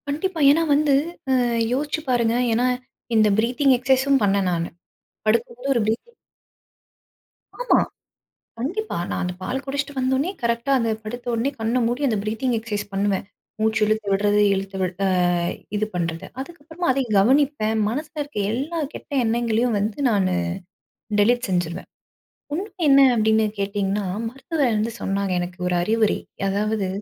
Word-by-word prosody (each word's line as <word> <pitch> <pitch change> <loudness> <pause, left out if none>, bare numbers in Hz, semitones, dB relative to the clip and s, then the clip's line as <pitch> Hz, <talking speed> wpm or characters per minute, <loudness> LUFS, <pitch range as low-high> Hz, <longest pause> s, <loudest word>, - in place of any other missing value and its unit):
கண்டிப்பா, 320 +5 -2
ஏன்னா 315 +3 +3
வந்து, 290 0 +3 0.4
அ - - +4 0.4
யோசிச்சு 295 +4 -1
பாருங்க, 235 -2 +2 0.2
ஏன்னா, 245 +3 +2 0.5
இந்த 215 -1 +5
பிரீத்திங் 250 +4 +3
எக்சைஸும் 265 +2 +3
பண்ணேன் 195 -2 +2
நானு. 170 -1 -1 0.6
படுக்கும் 230 +2 +1
போது 270 +3 -3
ஒரு 235 - +2
பிரீத்திங். 235 - -3 1.4
ஆமா. - - +3 0.8
கண்டிப்பா. 380 - -3
நான் - - -2
அந்த 180 0 -2
பால் 255 +8 -3
குடிச்சிட்டு 280 +1 -3
வந்தவுனே, 265 +5 +1
கரெக்டா 235 +3 0
அந்த 230 -1 0
படுத்தவுனே, 240 +2 -2
கண்ண 225 +3 0
மூடி 245 +4 -2
அந்த 220 -4 +1
பிரீத்திங் 225 +4 -1
எக்சைஸ் 210 -2 -4
பண்ணுவேன். 195 0 0 0.4
மூச்சு 220 0 +1
இழுத்து 215 0 0
விடுறது, 205 +1 +2
இழுத்து 195 0 -3
விட 185 -1 0 0.2
அ, - - +2 0.7
இது 210 +1 +1
பண்றது. 165 -2 -2
அதுக்கப்பறமா 325 +4 -6
அதையும் 250 -5 0
கவனிப்பேன். 260 -1 +2
மனசுல 305 +6 -5
இருக்க 285 -5 -12
எல்லா 285 +9 -2
கெட்ட - - -10
எண்ணங்களையும் 230 0 +1
வந்து 205 +1 -2
நானு 200 -4 +2 0.9
டெலிட் 240 +4 +3
செஞ்சுருவேன். 180 0 -2 0.7
உண்மை 385 +7 -3 0.2
என்ன 275 0 +7
அப்டின்னு 220 0 +3
கேட்டீங்கன்னா, 200 0 -1 0.2
மருத்துவர் 270 -1 -1
வந்து 220 +2 -1
சொன்னாங்க 195 0 -1
எனக்கு 175 0 -5
ஒரு 180 - +1
அறிவுரை, 220 +2 +2 0.3
அதாவது 205 0 0
230 Hz, 140 wpm, -23 LUFS, 205-275 Hz, 1.4 s, என்ன